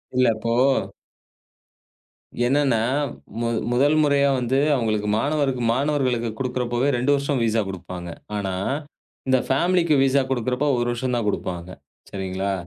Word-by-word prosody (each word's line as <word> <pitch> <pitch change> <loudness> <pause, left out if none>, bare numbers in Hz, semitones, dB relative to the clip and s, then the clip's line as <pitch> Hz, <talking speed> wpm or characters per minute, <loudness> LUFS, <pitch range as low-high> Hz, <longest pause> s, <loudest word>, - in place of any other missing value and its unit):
இல்ல, 125 0 +4
இப்போ 115 +1 -2 1.9
என்னன்னா, 135 -4 +2 0.6
மு 115 - 0 0.2
முதல் 145 +5 +3
முறையா 140 -1 +3
வந்து 125 +2 +1 0.2
அவங்களுக்கு 110 -4 -1
மாணவருக்கு, 140 -1 0
மாணவர்களுக்குக் 125 -5 0
குடுக்கிறப்பவே 125 0 -1
2 130 +4 +1
வருஷம் 140 -2 -1
விஸா 110 0 +2
குடுப்பாங்க. 90 -2 -7 0.3
ஆனா 95 -2 -2 0.7
இந்த 130 0 +4
ஃபேமிலிக்கு 170 +3 +2
விஸா 135 +1 +3
குடுக்கிறப்ப 125 +2 -1
1 120 0 0
வருஷம் 125 +1 -2
தான் 120 -3 -1
குடுப்பாங்க. 90 -3 -3 0.4
சரிங்களா? 95 0 -3
125 Hz, 120 wpm, -23 LUFS, 110-140 Hz, 1.9 s, இல்ல